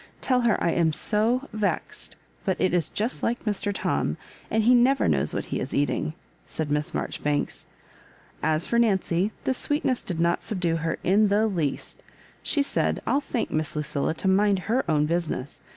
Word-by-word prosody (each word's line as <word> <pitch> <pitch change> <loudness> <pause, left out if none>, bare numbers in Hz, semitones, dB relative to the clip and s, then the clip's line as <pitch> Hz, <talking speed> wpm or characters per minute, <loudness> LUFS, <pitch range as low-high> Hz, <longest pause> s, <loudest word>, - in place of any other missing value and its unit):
Tell 255 -1 +2
her 235 -2 +3
I 170 - +3
am 165 -2 +2
so 230 - +1
vexed, 215 -2 -3 0.3
but 190 - -1
it 185 - +2
is 175 -2 +1
just 225 +5 -2
like 240 +1 -1
Mr. 205 -1 -1
Tom; 200 - -1 0.3
and 220 0 +2
he 245 +3 +6
never 255 +3 +4
knows - - +1
wha - - 0
he - - -4
is - - -4
eating," 145 +2 0 0.3
said 155 -2 -3
Miss 150 0 0
Marjoribanks. 145 -1 -2 0.7
As 155 +1 +1
for 235 - +1
Nancy, 195 -3 +2
this 260 - 0
sweetness 290 -4 0
did 175 -3 -4
not 170 +1 +2
subdue 180 -5 -1
her 165 0 -2
in 205 +3 +4
the 205 +2 +3
least. 170 -10 -2 0.4
She 290 -2 +1
said, - - 0
" - - -30
I'll 280 - +2
thank 255 -4 -3
Miss 155 0 -1
Lucilla 150 +1 -1
to 190 - -2
mind 200 +1 +4
her 245 +5 +1
own 150 -1 +3
business. 155 -4 -2
195 Hz, 185 wpm, -26 LUFS, 160-230 Hz, 0.7 s, he